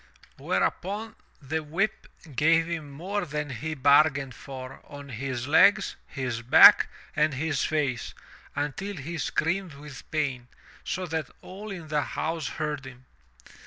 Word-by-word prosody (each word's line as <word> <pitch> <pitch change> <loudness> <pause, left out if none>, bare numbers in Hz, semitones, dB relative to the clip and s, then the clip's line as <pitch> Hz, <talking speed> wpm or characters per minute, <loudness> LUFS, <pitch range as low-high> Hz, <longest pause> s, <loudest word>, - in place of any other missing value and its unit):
Whereupon 210 +4 -1 0.3
the 160 +4 -2
whip 170 +8 -2 0.3
gave 165 +4 +4
him 165 -3 -4
more 185 +9 -3
than 150 -1 -4
he 155 +6 -4
bargained 140 -1 +4
for 130 +1 -9
on 145 0 -10
his 130 0 -4
legs, 200 +7 +5
his 125 -5 -3
back 120 - +8 0.3
and 150 -2 +2
his 145 0 -1
face, 140 -6 -1 0.4
until 150 +8 -3
he 160 +4 -5
screamed 165 +3 -1
with 145 -1 -11
pain, 135 -6 -2 0.4
so 185 +1 -3
that 160 -4 -3
all 200 +4 -9
in 175 -6 -7
the 150 -1 +1
house 160 0 -3
heard 150 -2 -3
him. 130 -1 -12
150 Hz, 135 wpm, -27 LUFS, 135-165 Hz, 0.4 s, back